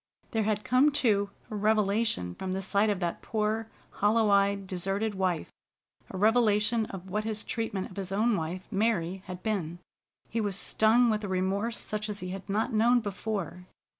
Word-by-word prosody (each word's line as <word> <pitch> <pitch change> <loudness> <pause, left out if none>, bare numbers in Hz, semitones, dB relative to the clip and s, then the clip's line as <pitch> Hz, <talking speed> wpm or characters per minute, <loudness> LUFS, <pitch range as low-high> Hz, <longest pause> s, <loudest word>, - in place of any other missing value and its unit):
There 220 -2 0
had 210 -1 0
come, 255 +4 +4
too, 210 -8 +2 0.2
a - - -3
revelation 210 - +1
from 185 - -4
the 190 +1 -2
sight 200 +3 +2
of 205 -3 0
that 170 -1 -2
poor, 220 0 -1 0.2
hollow 215 +1 +2
eyed, 200 0 +3
deserted 195 +4 -2
wife, 185 -4 -1 0.6
a - - -6
revelation 215 +1 +3
of 190 -1 -9
what 210 +2 0
his 215 -1 -3
treatment 215 -5 -3
of 185 - -13
his 195 -1 -4
own 215 +3 +2
wife, 175 +2 -4
Mary, 195 -4 0
had 180 -1 -7
been. 180 -7 -2 0.5
He 230 - -2
was 205 -3 -1
stung 225 +4 +3
with 215 0 -1
a - - -2
remorse 195 +5 -1
such 215 0 -4
as 205 -1 -4
he 180 - -4
had 195 +2 -7
not 220 +5 0
known 235 +3 +4
before. 200 -4 -4
205 Hz, 180 wpm, -29 LUFS, 190-220 Hz, 0.6 s, come